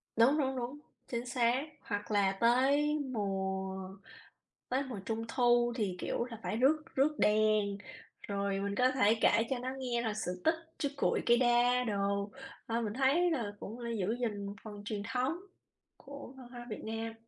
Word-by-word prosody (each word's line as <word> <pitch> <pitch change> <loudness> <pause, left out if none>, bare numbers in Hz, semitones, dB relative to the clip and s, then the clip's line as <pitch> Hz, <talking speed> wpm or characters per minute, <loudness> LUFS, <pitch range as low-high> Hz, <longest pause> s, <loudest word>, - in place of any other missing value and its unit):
Đúng, 245 +6 +5
đúng, 265 -3 0
đúng, 255 +4 -4 0.3
chính 240 0 -3
xác. 245 +2 +1 0.2
Hoặc 205 0 -4
là 200 -2 +3
tới 280 +6 +4
mùa 190 -2 -2 0.8
tới 260 +2 +1
mùa 250 -7 -6
Trung 225 0 -2
thu 240 -1 +3
thì, 205 -6 -1
kiểu 235 - -1
là, 230 -3 -9
phải 215 - -2
rước 295 +5 +3
rước 290 +3 +3
đèn, 210 -1 +3 0.5
rồi 200 -1 -1
mình 200 0 -2
có 250 +3 +4
thể 225 -4 +4
kể 225 - +5
cho 265 - -1
nó 255 +1 -3
nghe 245 -2 -1
là 225 -2 -1
sự 180 -4 -4
tích 320 +1 +5 0.2
chú 285 - 0
Cuội - - +1
cây 240 - +5
đa 245 0 +4
đồ, 200 -2 -1 0.4
ờ, 230 +1 0
mình 210 -2 -2
thấy 275 +8 +3
là 235 -10 -1
cũng 225 +4 -7
là 235 -1 -4
giữ 205 +3 0
gìn 205 -4 -2 0.2
phần 205 -2 -8
truyền 210 -1 -3
thống 260 +6 0 0.6
của 280 -2 -10
văn 255 -2 -11
hóa 240 -1 -8
Việt 215 - -5
Nam. 225 +1 -3
235 Hz, 180 wpm, -33 LUFS, 205-255 Hz, 0.8 s, Đúng